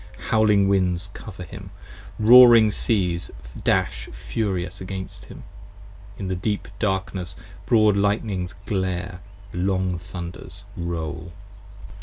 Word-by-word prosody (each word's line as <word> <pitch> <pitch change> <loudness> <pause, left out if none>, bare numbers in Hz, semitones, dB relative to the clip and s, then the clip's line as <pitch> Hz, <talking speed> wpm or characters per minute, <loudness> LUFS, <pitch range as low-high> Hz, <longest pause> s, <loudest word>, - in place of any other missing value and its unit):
Howling 105 -2 +4
winds 95 -2 0
cover 95 -4 -9
him: 85 - -10 0.5
roaring 115 -1 +8
seas 90 -6 -1 0.3
dash - - 0
furious 90 - -3
against 95 0 -7
him: - - -12 0.7
In 95 - -5
the 95 - -1
deep 105 +3 -2
darkness 95 -3 -2 0.3
broad 110 -4 +4
lightnings 100 -3 -1
glare, 90 -2 -2 0.3
long 90 -1 0
thunders 90 -1 -9
roll. 85 -1 -5
95 Hz, 100 wpm, -23 LUFS, 90-105 Hz, 0.7 s, roaring